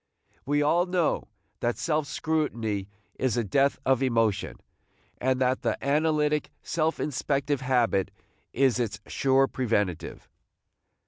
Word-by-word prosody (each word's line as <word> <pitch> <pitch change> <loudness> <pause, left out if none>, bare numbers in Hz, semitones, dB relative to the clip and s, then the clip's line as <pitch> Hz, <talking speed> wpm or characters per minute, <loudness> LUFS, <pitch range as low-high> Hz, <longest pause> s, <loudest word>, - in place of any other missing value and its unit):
We 145 +1 +2
all 170 +5 +3
know 180 -3 0 0.3
that 120 0 -1
self 155 -2 0
scrutiny 115 -13 -2 0.3
is 130 -2 +1
the 120 - +1
death 135 +7 +2
of 130 -1 +3
emotion, 115 -6 +1 0.6
and 130 0 +1
that 130 0 +1
the - - 0
analytic, 150 +1 +1
self 160 -1 0
inspective 140 0 -1
habit 120 -7 +1 0.4
is 130 -1 +2
its 105 -4 -2
sure 135 0 +3
preventive. 105 - -2
130 Hz, 120 wpm, -27 LUFS, 120-150 Hz, 0.6 s, all